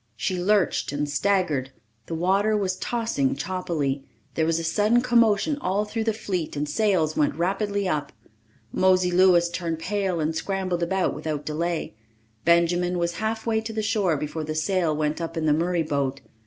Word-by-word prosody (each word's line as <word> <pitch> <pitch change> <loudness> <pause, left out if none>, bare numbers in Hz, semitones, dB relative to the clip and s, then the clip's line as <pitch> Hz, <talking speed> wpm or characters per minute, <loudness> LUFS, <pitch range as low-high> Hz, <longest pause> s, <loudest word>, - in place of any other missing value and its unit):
She 180 +10 -2
lurched 195 -6 +2
and 145 +1 -2
staggered. 150 -3 0 0.4
The 165 - -3
water 195 +5 +2
was 190 -2 -1
tossing 225 - -1
choppily. 150 -4 -2 0.3
There 160 -1 +1
was 165 0 +2
a 165 - -3
sudden 210 +8 +2
commotion 235 +3 +3
all 200 +1 0
through 220 +1 -3
the 225 - +2
fleet 185 -8 -3
and 145 +1 -2
sails 180 -4 +1
went 145 -2 +1
rapidly 200 +3 -1
up. 150 -4 -2 0.6
Mosey 185 -1 +3
Louis 175 -1 +5
turned 170 -1 -3
pale 190 0 -1
and 160 +1 -1
scrambled 185 -1 -2
about 185 +2 0
without 150 -2 -4
delay. 165 -3 -2 0.5
Benjamin 175 +1 +3
was 170 0 -1
halfway 220 0 0
to 225 0 -6
the 220 0 -2
shore 205 -7 +1
before 150 +2 -4
the 155 0 -4
sail 165 -1 +1
went 150 +2 -1
up 165 0 -4
in 160 - -1
the 150 - +4
Murray 170 +2 +1
boat. 140 -2 -2
175 Hz, 170 wpm, -25 LUFS, 155-200 Hz, 0.6 s, Louis